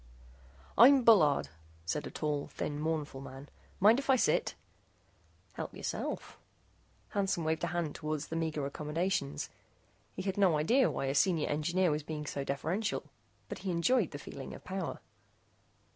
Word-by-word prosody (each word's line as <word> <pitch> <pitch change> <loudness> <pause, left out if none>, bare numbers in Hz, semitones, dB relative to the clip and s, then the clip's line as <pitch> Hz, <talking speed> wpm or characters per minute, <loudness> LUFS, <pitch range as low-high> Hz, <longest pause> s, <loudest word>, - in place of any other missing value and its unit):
"I'm 265 +2 +8
Bullard," 160 -12 +5 0.4
said 150 - -2
a - - -6
tall, 150 -2 -2
thin, 145 0 -4
mournful 155 -3 -2
man. 135 +1 -10 0.3
"Mind 220 +6 +6
if 280 - -6
I 265 - +7
sit?" 255 - +1 1.0
"Help - - -6
yourself," - - -4 0.7
Hansen 195 -4 0
waved 160 +1 -1
a - - +2
hand 170 -3 -2
toward 155 -1 -3
the 160 - -5
meager 160 -3 -1
accommodations. 150 - -2 0.6
He 185 - -4
had 195 0 -2
no 180 -6 +4
idea 235 - +3
why - - -2
a 135 - 0
Senior 160 +1 +2
Engineer 170 +4 +1
was 150 +1 -1
being 150 0 -5
so 140 -1 -3
deferential, 165 +11 -1 0.4
but - - -6
he 195 - -4
enjoyed 180 +4 +2
the 145 - -7
feeling 140 -1 -8
of - - -12
power. 190 -2 -4
160 Hz, 155 wpm, -32 LUFS, 150-190 Hz, 1.0 s, I'm